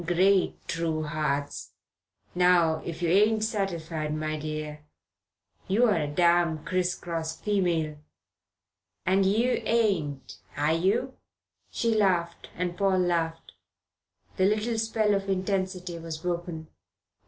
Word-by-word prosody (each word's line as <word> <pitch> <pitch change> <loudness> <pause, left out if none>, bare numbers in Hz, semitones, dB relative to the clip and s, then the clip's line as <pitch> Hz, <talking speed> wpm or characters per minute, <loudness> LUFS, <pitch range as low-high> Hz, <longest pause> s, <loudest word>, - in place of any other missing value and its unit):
"Great 185 +3 +2
true 165 -1 -1
hearts! 150 -2 -3 0.6
Now 175 -3 +3
if 170 +1 -6
you 170 - +2
ain't 215 +4 +4
satisfied, 165 -8 -2
my 155 0 -2
dear, 155 0 -5 0.8
you're 215 +3 +3
a 155 -4 0
damn 170 0 +2
criss 180 +1 0
cross 165 -2 -4
female. 170 -7 0 1.1
And 190 +1 +3
yer 230 +6 +2
ain't, 185 -12 0 0.2
are 150 +2 +2
yer?' 195 +10 +1 0.6
She 230 -2 0
laughed 180 -5 0
and 175 0 -2
Paul 195 0 +2
laughed. 170 -2 -1 0.9
The 185 - +3
little 215 +3 +1
spell 220 -1 +1
of 195 0 -1
intensity 185 -2 -2
was 165 -1 -6
broken. 170 -1 -4
175 Hz, 115 wpm, -27 LUFS, 160-195 Hz, 1.1 s, ain't